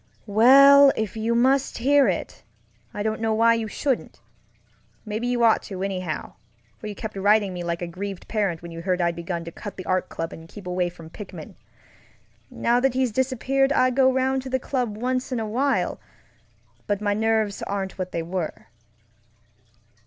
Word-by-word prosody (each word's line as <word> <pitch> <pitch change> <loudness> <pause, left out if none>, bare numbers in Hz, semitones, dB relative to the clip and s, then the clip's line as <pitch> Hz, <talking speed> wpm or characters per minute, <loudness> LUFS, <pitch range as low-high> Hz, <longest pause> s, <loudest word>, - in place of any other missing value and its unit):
Well, 275 +6 +7
if 220 0 -3
you 225 +1 0
must 265 +3 +2
hear 280 +3 +4
it, - - -3 0.5
I 205 - -4
don't 220 +1 -2
know 220 -1 +1
why 230 +1 +5
you 230 -1 -2
shouldn't. 260 +4 -2 0.9
Maybe 220 +3 -3
you 245 -1 +1
ought 225 -1 +4
to, 190 -1 -5
anyhow, 185 -6 -4 0.5
for - - -7
you 210 - -6
kept 215 +1 -6
writing 205 0 +2
me 175 -1 -5
like 170 0 -3
a - - -3
grieved 190 +2 -6
parent 195 -7 -1
when 170 - -8
you 165 0 -7
heard 180 +1 0
I'd 170 -1 +1
begun 170 0 -4
to 170 - -7
cut 205 +4 -9
the 185 - -7
Art 185 0 0
Club 165 0 -5
and 165 0 -12
keep 200 +1 -11
away 180 0 -1
from 165 -2 -13
Pickman. 210 - -9 1.0
Now 240 +1 +1
that 260 0 +1
he's 260 -2 +1
disappeared 265 +3 +1
I 255 -2 +3
go 260 +1 +4
around 260 0 0
to 260 - -8
the 260 - +1
club 250 -5 -3
once 255 +3 -2
in 250 - -1
a 220 - -2
while, 240 -4 0 0.9
but 205 -1 0
my 205 -1 0
nerves 220 -1 0
aren't 195 -1 -4
what 185 0 -3
they 165 - -2
were. 170 -8 -5
215 Hz, 185 wpm, -24 LUFS, 185-255 Hz, 1.0 s, Well